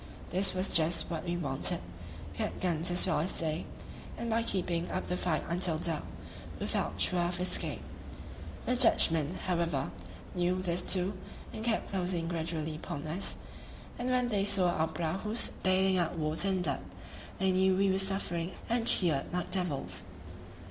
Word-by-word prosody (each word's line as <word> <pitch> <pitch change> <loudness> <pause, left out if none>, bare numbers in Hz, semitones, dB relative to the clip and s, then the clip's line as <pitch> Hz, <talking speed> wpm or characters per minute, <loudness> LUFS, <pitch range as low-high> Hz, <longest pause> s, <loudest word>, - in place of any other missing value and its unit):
This 190 +1 +2
was 185 +1 +1
just 165 +2 +1
what 165 +1 -3
we 175 0 -1
wanted; 140 -6 0 0.5
we - - -12
had - - -2
guns 170 -2 +1
as 175 0 +2
well 180 -5 +2
as 170 +5 -1
they, 160 -1 -2 0.5
and 235 -1 -3
by 225 +1 +3
keeping 175 -5 -1
up 185 - -2
the 180 - -1
fight 175 -3 0
until 170 -1 +1
dark, 160 -1 0 0.6
we - - -2
felt - - -1
sure 180 - +3
of 175 +1 0
escape. 180 0 +1 0.8
The 250 - +2
Dutchmen, 165 - +4
however, 170 -6 0 0.4
knew 180 0 +1
this 175 0 0
too, 185 +2 +2 0.4
and 220 - -5
kept 230 -1 0
closing 180 -3 -1
gradually 160 -2 -2
upon 145 -2 -5
us; 170 +6 -1 0.6
and 245 +1 -1
when 250 -1 +2
they 205 -3 +1
saw 190 -3 +3
our 160 -1 +1
prahus 175 +8 -1
bailing 190 0 +3
out 170 0 0
water 155 +4 0
and 190 -2 +1
blood, 140 -5 -1 0.6
they 190 0 +2
knew 190 0 +4
we 195 0 +3
were 190 - +1
suffering 190 -3 -1
and 235 0 0
cheered 155 -7 +4
like 180 0 -2
devils. 140 - 0
180 Hz, 170 wpm, -32 LUFS, 165-190 Hz, 0.8 s, Dutchmen